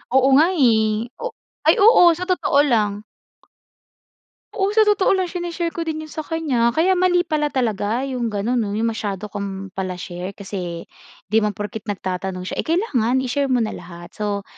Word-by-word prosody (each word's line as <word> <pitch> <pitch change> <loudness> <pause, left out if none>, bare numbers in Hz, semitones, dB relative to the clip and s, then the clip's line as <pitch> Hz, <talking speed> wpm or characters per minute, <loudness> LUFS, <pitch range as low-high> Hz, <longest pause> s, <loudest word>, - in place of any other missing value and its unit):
Oo 265 0 +5
nga 315 +3 +6
eh. 220 -5 +2
O - - -4 0.4
ay, 320 - +7
oo, 420 -5 +8
sa 365 - -4
totoo 365 -6 +2
lang. 210 -5 0 1.5
Oo, 390 -3 0
sa 440 - +6
totoo 415 -2 +3
lang 370 -2 -1
shine-share 345 -1 -3
ko - - -8
din 315 -1 -3
'yon 310 - -11
sa 315 - -6
kanya, 255 -8 0
kaya 340 +4 +3
mali 360 -1 +3
pala 305 -3 0
talaga 230 -3 -1
yung 255 -3 -2
gano'n, 225 +4 -1
'no? 205 -3 -2
Yung 225 +1 0
masyado 210 -2 -5
kang 195 -1 -5
pala-share 185 0 -5
kasi 180 -4 -6 0.5
'di 220 - +5
naman 210 -2 -1
porket 210 +2 -6
nagtatanong 185 -2 -4
siya 185 - -5
eh - - -2
kailangan 260 - +1
i-share 275 +2 0
mo 250 -3 +2
na 215 - -2
lahat. 175 -1 -10
So, 205 -1 -3
230 Hz, 175 wpm, -21 LUFS, 200-315 Hz, 1.5 s, oo